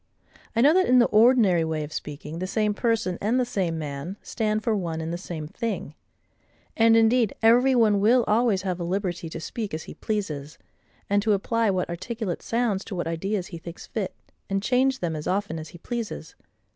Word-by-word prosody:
I 230 Hz, -, +3 dB
know 290 Hz, +5 st, +6 dB
that, 370 Hz, +1 st, +3 dB
in 255 Hz, -, +5 dB
the 240 Hz, -, +6 dB
ordinary 215 Hz, -6 st, +5 dB
way 160 Hz, -1 st, -2 dB
of 150 Hz, -, -8 dB
speaking, 150 Hz, +2 st, -6 dB
the 185 Hz, -, -3 dB
same 210 Hz, +1 st, +1 dB
person, 220 Hz, -6 st, 0 dB
and 230 Hz, +5 st, +1 dB
the 250 Hz, -, +2 dB
same 185 Hz, -8 st, -1 dB
man, 150 Hz, +5 st, -5 dB
stand 215 Hz, -2 st, -1 dB
for 225 Hz, -, +1 dB
one 170 Hz, -5 st, -3 dB
and 160 Hz, +1 st, -3 dB
the -, -, -1 dB
same 165 Hz, -4 st, -6 dB
thing. 190 Hz, -1 st, -4 dB, 0.8 s
And 225 Hz, 0 st, +5 dB
indeed 225 Hz, -1 st, +3 dB
every 245 Hz, +4 st, +5 dB
one 215 Hz, -4 st, +4 dB
will 235 Hz, +5 st, +4 dB
always 215 Hz, -3 st, +2 dB
have 185 Hz, -2 st, -2 dB
a -, -, -2 dB
liberty 175 Hz, -1 st, -2 dB
to 165 Hz, -, -6 dB
speak 210 Hz, +2 st, -4 dB
as 160 Hz, -, -5 dB
he -, -, -9 dB
pleases, 155 Hz, -9 st, -4 dB, 0.5 s
and 205 Hz, 0 st, +2 dB
to 215 Hz, 0 st, +2 dB
apply 225 Hz, +3 st, +1 dB
what 185 Hz, -2 st, 0 dB
articulate 185 Hz, +2 st, -4 dB
sounds 230 Hz, -4 st, 0 dB
to 200 Hz, -, -6 dB
what 175 Hz, -, -2 dB
ideas 180 Hz, +3 st, -2 dB
he 170 Hz, -, -5 dB
thinks 170 Hz, +1 st, -9 dB
fit, 200 Hz, -4 st, -4 dB, 0.3 s
and 195 Hz, 0 st, -1 dB
change 260 Hz, +2 st, +2 dB
them 165 Hz, -3 st, -1 dB
as 150 Hz, -, -5 dB
often 190 Hz, -4 st, -1 dB
as 155 Hz, 0 st, -8 dB
he -, -, -12 dB
pleases. 230 Hz, +5 st, -5 dB
200 Hz, 205 wpm, -25 LUFS, 170-230 Hz, 0.8 s, know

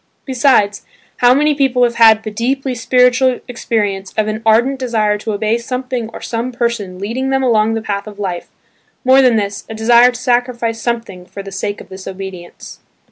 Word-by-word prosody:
Besides, 245 Hz, -6 st, +2 dB, 0.3 s
how 245 Hz, +1 st, +5 dB
many 300 Hz, +2 st, +3 dB
people 265 Hz, -3 st, +1 dB
have 240 Hz, -1 st, +2 dB
had 220 Hz, -2 st, +5 dB
the 215 Hz, -, -5 dB
deeply 260 Hz, +4 st, -2 dB
spiritual 250 Hz, +2 st, +2 dB
experience 205 Hz, -5 st, -2 dB
of 215 Hz, -1 st, +1 dB
an 215 Hz, +1 st, -3 dB
ardent 240 Hz, +5 st, +3 dB
desire 220 Hz, -5 st, 0 dB
to 215 Hz, +1 st, -4 dB
obey 215 Hz, +3 st, 0 dB
something 250 Hz, -1 st, -4 dB
or -, -, -10 dB
some 235 Hz, +2 st, -3 dB
person 235 Hz, -6 st, -3 dB
leading 235 Hz, +7 st, -3 dB
them 270 Hz, 0 st, +1 dB
along 225 Hz, -3 st, +2 dB
the 225 Hz, -, -4 dB
path 200 Hz, 0 st, -3 dB
of 210 Hz, -1 st, -10 dB
life–more 205 Hz, +7 st, -1 dB
than 250 Hz, -3 st, +4 dB
this, 200 Hz, -2 st, -2 dB
a 220 Hz, -, -6 dB
desire 235 Hz, +2 st, +5 dB
to 245 Hz, -1 st, -6 dB
sacrifice 240 Hz, -2 st, -1 dB
something 225 Hz, -7 st, -4 dB
for 195 Hz, +2 st, -8 dB
the 195 Hz, -, -9 dB
sake 205 Hz, +2 st, -4 dB
of -, -, -15 dB
this 190 Hz, 0 st, -10 dB
obedience. 190 Hz, -2 st, -9 dB
230 Hz, 185 wpm, -16 LUFS, 205-250 Hz, 0.3 s, how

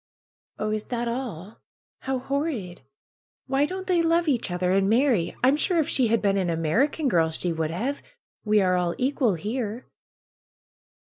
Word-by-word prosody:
^^Oh, 215 Hz, 0 st, -2 dB
is 215 Hz, -1 st, -3 dB
that 240 Hz, -1 st, -3 dB
all? 225 Hz, -6 st, -5 dB, 0.4 s
How 265 Hz, 0 st, -2 dB
horrid! 260 Hz, -, -3 dB, 0.6 s
Why 275 Hz, +2 st, +1 dB
don't 375 Hz, +2 st, -5 dB
they 360 Hz, -2 st, +2 dB
love 335 Hz, +1 st, +2 dB
each 250 Hz, -8 st, 0 dB
other 180 Hz, 0 st, 0 dB
and 195 Hz, +1 st, +2 dB
marry? 230 Hz, -6 st, +2 dB
I'm 265 Hz, +3 st, +5 dB
sure 345 Hz, +4 st, +1 dB
if 315 Hz, -, +2 dB
she 255 Hz, -3 st, +2 dB
had 225 Hz, 0 st, +1 dB
been 200 Hz, -1 st, +2 dB
an 185 Hz, -3 st, 0 dB
American 220 Hz, -, +1 dB
girl 165 Hz, -8 st, +3 dB
she 170 Hz, +2 st, -2 dB
would 160 Hz, -1 st, -2 dB
have. 245 Hz, -, -3 dB, 0.4 s
We 210 Hz, -1 st, +3 dB
are 185 Hz, -1 st, +2 dB
all 175 Hz, -1 st, 0 dB
equal 255 Hz, -5 st, +1 dB
here." 220 Hz, +5 st, -4 dB
230 Hz, 165 wpm, -25 LUFS, 180-275 Hz, 0.6 s, I'm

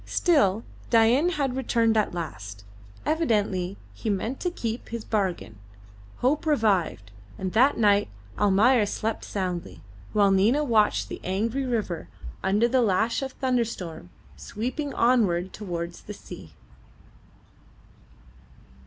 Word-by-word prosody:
Still, 225 Hz, -, +2 dB, 0.3 s
Dain 240 Hz, +8 st, +4 dB
had 280 Hz, -7 st, -1 dB
returned 230 Hz, -3 st, +1 dB
at 215 Hz, -1 st, +2 dB
last. 100 Hz, -, -6 dB, 0.4 s
Evidently 205 Hz, -, 0 dB, 0.2 s
he 225 Hz, -, -4 dB
meant 220 Hz, +6 st, -2 dB
to 360 Hz, -, -1 dB
keep 230 Hz, -8 st, -4 dB
to -, -, -17 dB
his 230 Hz, -2 st, -4 dB
bargain. 175 Hz, -, -2 dB, 0.6 s
Hope 285 Hz, +5 st, +1 dB
revived, 200 Hz, -, +1 dB, 0.3 s
and 185 Hz, -1 st, -4 dB
that 255 Hz, +6 st, +4 dB
night 205 Hz, -2 st, +3 dB, 0.3 s
Almayer 210 Hz, +3 st, +4 dB
slept 220 Hz, +2 st, -3 dB
soundly, 180 Hz, -, -4 dB, 0.3 s
while 205 Hz, -2 st, +4 dB
Nina 220 Hz, +10 st, +3 dB
watched 220 Hz, -6 st, +2 dB
the -, -, -7 dB
angry 225 Hz, +8 st, -1 dB
river 205 Hz, -, -2 dB, 0.3 s
under 205 Hz, +5 st, +2 dB
the 255 Hz, +1 st, +2 dB
lash 225 Hz, +3 st, +1 dB
of 270 Hz, -1 st, -4 dB
the -, -, -30 dB
thunderstorm 225 Hz, -, -2 dB, 0.3 s
sweeping 245 Hz, -, -4 dB
onward 195 Hz, -7 st, +2 dB
towards 175 Hz, -4 st, -5 dB
the 210 Hz, -, -9 dB
sea. 80 Hz, -, -12 dB
215 Hz, 125 wpm, -26 LUFS, 185-245 Hz, 0.6 s, Dain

